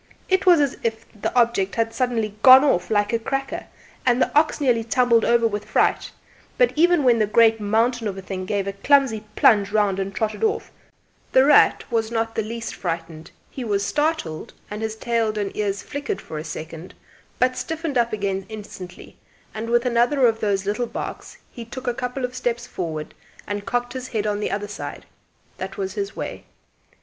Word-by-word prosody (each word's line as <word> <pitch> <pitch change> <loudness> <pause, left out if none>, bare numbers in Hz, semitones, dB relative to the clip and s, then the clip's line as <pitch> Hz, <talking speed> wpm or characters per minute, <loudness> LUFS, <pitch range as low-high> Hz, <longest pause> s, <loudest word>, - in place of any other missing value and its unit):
It 375 0 +1
was 350 -3 +7
as 285 -3 +1
if 225 0 -2
the 210 - -3
object 230 -5 +2
had 225 -1 0
suddenly 230 -3 -1
'gone 260 +2 +9
off' 180 -11 +1
like 205 0 +1
a 230 - +2
cracker, 270 +3 -3 0.4
and 245 -1 +3
the - - 0
ox 310 +2 +3
nearly 245 -5 +2
tumbled 235 0 +3
over 235 -1 +3
with 210 -2 -1
fright; - - +1 0.5
but - - +3
even 340 0 +4
when 240 -3 +4
the 215 - +2
great 225 +1 +4
mountain 225 +3 +1
of 195 -2 -4
a - - -6
thing 185 -1 -5
gave 200 -1 -1
a 195 - -3
clumsy 235 0 +2
plunge 200 -3 +4
round 205 -3 +1
and 195 0 -4
trotted 215 - -2
off, 440 0 0 0.6
"The 260 +1 +6
Rat" 295 0 +5
was 225 -1 0
not 225 -1 -1
the 225 - -1
least 230 +1 -5
frightened; 165 -2 -5 0.2
he 260 - -6
was 200 -3 0
startled, 295 - -2 0.2
and 210 +1 -5
his 220 -1 -3
tail 225 -2 -1
and 205 -2 -3
ears 200 -2 -2
flickered 285 -8 -4
for 155 - -7
a - - -5
second, 165 +2 -8 0.4
but 255 0 +2
stiffened 320 +1 -4
up 235 -1 +2
again 195 -2 -2
instantly, 200 -4 -10 0.4
and 220 +1 -5
with 240 +1 +2
another 245 +3 +3
of 225 -2 +2
those 200 -2 0
little 215 +4 -1
barks - - -7
he 235 - -8
took 250 +3 -9
a 245 - 0
couple 250 +1 -3
of 250 - -7
steps 240 -2 -2
forward 160 -8 -5 0.3
and 205 0 -5
cocked 245 0 -1
his 255 -1 -5
head 215 -4 -2
on 205 -1 -1
the 210 - -2
other 205 +2 -3
side. 205 - -7 0.5
That - - -6
was 385 -1 -3
his 400 -1 -4
way. - - -6
225 Hz, 195 wpm, -23 LUFS, 205-250 Hz, 0.6 s, gone